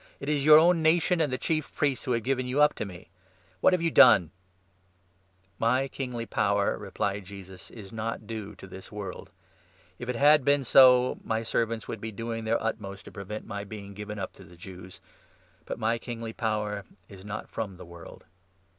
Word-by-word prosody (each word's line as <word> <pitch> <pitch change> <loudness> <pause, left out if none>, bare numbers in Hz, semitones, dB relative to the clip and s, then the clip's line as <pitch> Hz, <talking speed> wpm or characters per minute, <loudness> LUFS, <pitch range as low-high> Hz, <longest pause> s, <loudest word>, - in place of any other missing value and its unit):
" - - -30
It 140 - -5
is 150 - +2
35 - - -2
your 155 0 +10
own 170 +1 +5
nation 165 +2 +3
and 150 -4 +1
the 130 - -1
Chief 155 0 -2
Priests 140 -3 0
who 125 - 0
have 115 -1 -1
given 130 +1 -1
you 130 +3 -1
up 150 0 +5
to - - -4
me. 90 -3 -11 0.5
What - - +5
have 180 -2 +1
you 165 - +1
done? 85 - +7 0.6
" 90 +1 -39
"My 130 +3 +2
kingly 125 -4 -5
power," 100 -2 +1
replied 100 0 -3
Jesus, 95 -1 -11
"is 100 -4 -11
not 110 0 -4
due 105 -2 -6
to 95 - -12
this 95 +1 -10
36 - - -16
world. 100 -3 -7 0.7
If 120 - -6
it 125 - -1
had 145 +3 +5
been 140 +1 +3
so, 125 0 +6
my 110 0 -1
servants 115 0 -1
would 110 - -6
be 110 - -5
doing 115 +1 -5
their 115 +1 +1
utmost 100 -3 -4
to - - -11
prevent 105 +2 -7
my 100 0 -5
being 100 -1 -9
given 105 +1 -7
up 95 -2 -5
to - - -15
the 85 +1 -16
Jews; 90 +1 -11 0.6
but - - -5
my 115 +1 0
kingly 115 -1 -6
power 105 -3 -2 0.2
is 95 -2 -13
not 105 0 -6
from 100 -5 -5
the 90 - -11
world." 85 0 -12
110 Hz, 210 wpm, -28 LUFS, 100-125 Hz, 0.7 s, your